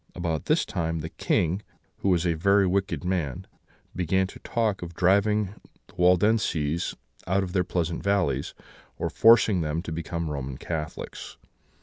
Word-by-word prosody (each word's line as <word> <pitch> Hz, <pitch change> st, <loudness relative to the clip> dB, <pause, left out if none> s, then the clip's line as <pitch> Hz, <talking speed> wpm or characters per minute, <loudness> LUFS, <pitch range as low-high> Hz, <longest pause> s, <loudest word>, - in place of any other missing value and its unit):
"About 85 Hz, -4 st, -2 dB
this -, -, +2 dB
time 80 Hz, -1 st, -2 dB
the 80 Hz, -, -5 dB
King, 90 Hz, +4 st, 0 dB, 0.4 s
who 100 Hz, -, -1 dB
was 90 Hz, -2 st, +2 dB
a 85 Hz, -, +2 dB
very 100 Hz, +4 st, +3 dB
wicked 95 Hz, 0 st, 0 dB
man, 85 Hz, -8 st, -2 dB, 0.5 s
began 95 Hz, +2 st, +1 dB
to 95 Hz, -, -10 dB
talk 110 Hz, -4 st, -1 dB
of 85 Hz, -1 st, -7 dB
driving 100 Hz, +3 st, +3 dB, 0.4 s
the -, -, -22 dB
Waldenses 90 Hz, -4 st, +2 dB, 0.3 s
out 95 Hz, +2 st, +2 dB
of 90 Hz, -1 st, -5 dB
their 90 Hz, -, +2 dB
pleasant 85 Hz, -1 st, -2 dB
valleys, 90 Hz, -9 st, 0 dB, 0.4 s
or -, -, -2 dB
forcing 110 Hz, -5 st, +5 dB
them 80 Hz, +2 st, -2 dB
to 85 Hz, -, -6 dB
become 85 Hz, 0 st, -3 dB
Roman 70 Hz, -2 st, -4 dB
Catholics. 80 Hz, 0 st, -6 dB
90 Hz, 150 wpm, -26 LUFS, 80-95 Hz, 0.5 s, forcing